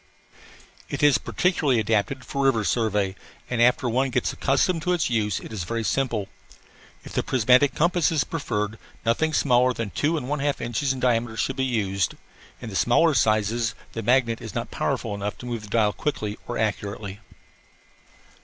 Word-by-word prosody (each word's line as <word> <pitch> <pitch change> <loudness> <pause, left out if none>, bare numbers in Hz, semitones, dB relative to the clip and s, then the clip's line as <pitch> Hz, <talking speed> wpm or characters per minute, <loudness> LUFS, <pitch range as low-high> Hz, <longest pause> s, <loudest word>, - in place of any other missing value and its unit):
It - - -3
is 145 -2 +5
particularly 150 -9 +1
adapted 110 +5 0
for 140 0 -1
river 115 -5 +3
survey 105 -4 0 0.4
and, 120 -1 +1
after 125 +1 +4
one 130 +3 +1
gets 125 -1 0
accustomed 160 +5 +1
to 180 +2 +1
its 165 -8 0
use, 105 -4 0
it - - -10
is 100 -5 -3
very 115 +6 -3
simple. 115 -5 0 0.8
If - - -11
the - - +1
prismatic 130 +2 +3
compass 170 0 +2
is 155 -4 +2
preferred, 110 - -3 0.3
nothing 135 +8 +2
smaller 125 -3 +3
than 115 -4 -4
two 160 +3 0
and 125 - -4
one 150 +1 -1
half 145 0 0
inches 125 +4 -1
in 135 - -3
diameter 120 -2 +1
should 135 - -1
be 130 - +1
used. 100 -7 0 0.5
In 115 -3 -6
the - - -7
smaller 155 - +4
sizes 110 0 +1 0.2
the 115 - -3
magnet 120 0 +2
is - - -8
not - - -3
powerful - - -2
enough 100 0 -4
to - - -10
move 120 -2 -3
the 105 - -10
dial 105 -2 +2
quickly 110 -8 -3
or 120 - -3
accurately. 105 -2 -3
120 Hz, 180 wpm, -24 LUFS, 110-135 Hz, 0.8 s, is